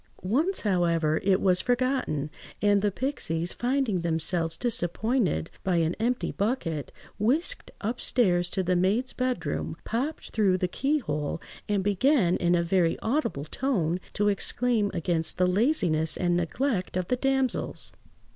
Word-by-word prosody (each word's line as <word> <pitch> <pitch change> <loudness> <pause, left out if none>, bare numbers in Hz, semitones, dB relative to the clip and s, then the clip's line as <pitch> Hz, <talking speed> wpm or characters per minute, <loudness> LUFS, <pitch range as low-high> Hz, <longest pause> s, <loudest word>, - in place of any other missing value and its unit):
Once, 300 - +1
however, 170 -5 +1
it 190 -1 +3
was 185 -1 +3
forgotten; 245 - 0 0.3
and 205 -1 +3
the 205 - +2
pixies, 180 - -2
finding 245 -7 0
themselves 165 0 0
disappointed 220 - 0
by 185 -2 +1
an 165 0 +2
empty 245 +3 0
bucket, 195 - -2 0.3
whisked 300 - +1
upstairs 205 -5 +1
to 190 - -1
the 180 0 +1
maids' 200 +9 +1
bedroom, 175 - -2
popped 260 +8 -3
through 200 -4 +2
the 180 - 0
keyhole, 180 - -1 0.3
and 200 -2 +1
began, 205 - +3
in 175 0 +2
a 170 - +2
very 170 -1 +2
audible 220 - -1
tone, 180 - -1
to 205 - 0
exclaim 215 +1 +1
against 170 -2 -1
the 180 - +3
laziness 180 - +2
and 175 -1 +1
neglect 185 - -1
of 180 -1 -2
the 250 - +3
damsels. 265 0 0
195 Hz, 135 wpm, -27 LUFS, 170-250 Hz, 0.3 s, it